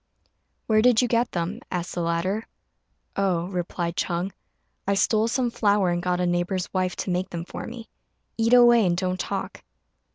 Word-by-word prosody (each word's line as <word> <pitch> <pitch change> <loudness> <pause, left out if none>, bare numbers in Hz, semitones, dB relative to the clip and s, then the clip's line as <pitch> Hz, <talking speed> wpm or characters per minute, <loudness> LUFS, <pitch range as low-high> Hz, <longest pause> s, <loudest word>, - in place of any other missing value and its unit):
"Where 215 -1 +3
did 245 0 +5
you - - +2
get 235 0 +1
them?" 175 +6 -3
asked 180 -1 -3
the 175 - -2
latter. 170 +6 -1 0.7
"Oh," 185 -4 +1
replied 175 -2 -3
Ch'êng, 180 +1 -1 0.6
"I 200 - +2
stole 215 +2 +2
some 240 0 0
flour 205 -5 +2
and 175 0 -1
got 180 0 0
a 180 - +1
neighbour's 175 +1 -1
wife 185 -1 0
to 185 - -3
make 180 +1 -1
them 170 -1 -5
for - - -7
me. 230 -1 -8 0.5
Eat 230 +2 +4
away, 240 -2 +7
and 175 -2 +1
don't 185 0 -1
talk." - - -4
185 Hz, 175 wpm, -25 LUFS, 175-225 Hz, 0.7 s, away